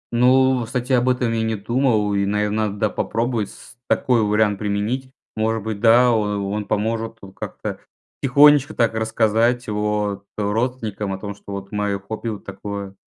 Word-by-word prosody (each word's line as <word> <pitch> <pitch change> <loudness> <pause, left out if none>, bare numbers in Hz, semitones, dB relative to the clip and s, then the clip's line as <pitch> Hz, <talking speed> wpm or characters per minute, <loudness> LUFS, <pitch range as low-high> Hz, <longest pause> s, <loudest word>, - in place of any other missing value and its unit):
Ну, 130 +1 +4
кстати 125 +2 -2
об 125 0 +3
этом 125 -2 +1
я 115 - 0
не 110 0 0
думал, 110 -1 +1
и, 100 0 +1
наверно, 105 +1 0
надо, 100 0 -5
да, 110 +1 +1
попробовать, 115 -1 -1
с - - -15
такой 125 -3 +2
вариант 105 -1 +2
применить. 105 +6 -2 0.3
Может 110 0 0
быть, 110 -2 -4
да, 120 +3 +6
о 105 -3 0
он 100 +1 -3
поможет 115 +2 -2
вот 95 - -10
как-то - - -6 0.4
тихонечко 145 +2 +5
так 115 -2 +2
рассказать 110 +2 +1
о 105 -1 -1 0.2
родственникам 105 -1 -2
о - - -4
том, 100 +1 -6
что 100 0 -10
вот 100 0 -7
моё 105 -1 -1
хобби- 110 +3 -6
вот 105 -2 -7
такое. 100 0 -6
110 Hz, 170 wpm, -21 LUFS, 105-120 Hz, 0.4 s, да